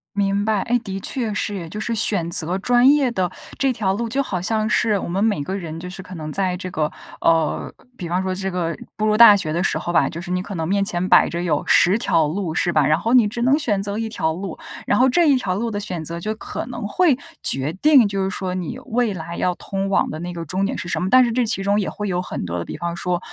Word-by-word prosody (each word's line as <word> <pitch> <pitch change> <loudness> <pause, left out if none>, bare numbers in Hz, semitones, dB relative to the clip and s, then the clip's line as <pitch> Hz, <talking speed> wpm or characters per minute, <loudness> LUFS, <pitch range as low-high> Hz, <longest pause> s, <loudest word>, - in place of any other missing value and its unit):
明 200 0 +1
白， 215 -3 +1
哎， 245 +1 +1
的 195 -4 -5
确 225 0 -3
是 205 -4 -3
哎， - - -8
就 210 - -6
是 230 +1 -2
选 200 -5 +1
择 170 +2 -1
专 245 +4 +4
业 280 -4 +2
的 185 -6 -1 0.3
这 270 -2 +1
条 195 -4 0
路 230 +3 -2
就 270 +5 0
好 185 -9 -3
像 215 +3 -1
是 210 -2 +2
我 - - -5
们 195 +4 0
每 205 -10 +1
个 190 +6 -3
人 165 -3 -6
就 180 +1 -7
是 190 0 -8
可 185 - -11
能 155 -2 -6
在 185 -1 0
这 185 0 -6
个 155 -4 -1 0.3
呃， 165 -2 +1 0.2
比 175 - -5
方 180 +2 0
说 185 0 -2
这 190 0 -3
个 170 -2 -2 0.2
步 215 0 0
入 215 0 +2
大 230 -3 +9
学 155 -6 -2
的 170 +3 0
时 - - 0
候 175 - -3
吧， 175 - +3
就 170 +1 -6
是 175 - -9
你 180 0 0
可 200 - -7
能 160 -2 -3
面 200 +1 +1
前 185 -2 -2
摆 - - +6
着 170 - -3
有 165 -4 0
10 185 +4 +4
条 165 -9 +2
路 170 0 -3
是 175 +1 +1
吧， 150 -4 +3
然 155 +3 +3
后 230 +5 0
你 230 -4 +6
只 235 +3 -4
能 265 +4 +4
选 210 -10 0
择 200 +1 -4
1 225 0 -2
条 160 -7 -1
路， 185 0 -6 0.3
然 205 - +2
后 260 +1 +5
这 335 +4 +3
一 280 - +5
条 185 -7 -1
路 230 +2 -2
的 205 - -3
选 180 -6 -4
择 170 +2 -4
就 215 +5 -3
可 225 - -6
能 235 -4 -5
会 305 - +3 0.2
决 135 +4 -1
定， 265 +2 +5
就 195 -1 -2
是 190 - -1
说 190 -2 -3
你 185 +7 -4
未 230 -3 0
来 170 +1 -6
要 180 -1 0
通 195 0 -4
往 195 - +1
的 155 - -6
那 175 +1 -5
个 170 -1 -6
终 185 +5 -2
点 195 - -1
是 175 - -6
什 - - -2
么。 185 - -1
但 255 +1 +6
是 235 - -1
这 250 +1 +1
其 205 -4 -2
中 205 +1 +2
也 - - -2
会 210 0 -5
有 180 -1 -1
很 180 - -5
多 85 0 -3
的， - - -4
比 - - -7
方 170 0 -3
说 175 0 -1
195 Hz, 300 characters per minute, -21 LUFS, 175-220 Hz, 0.3 s, 大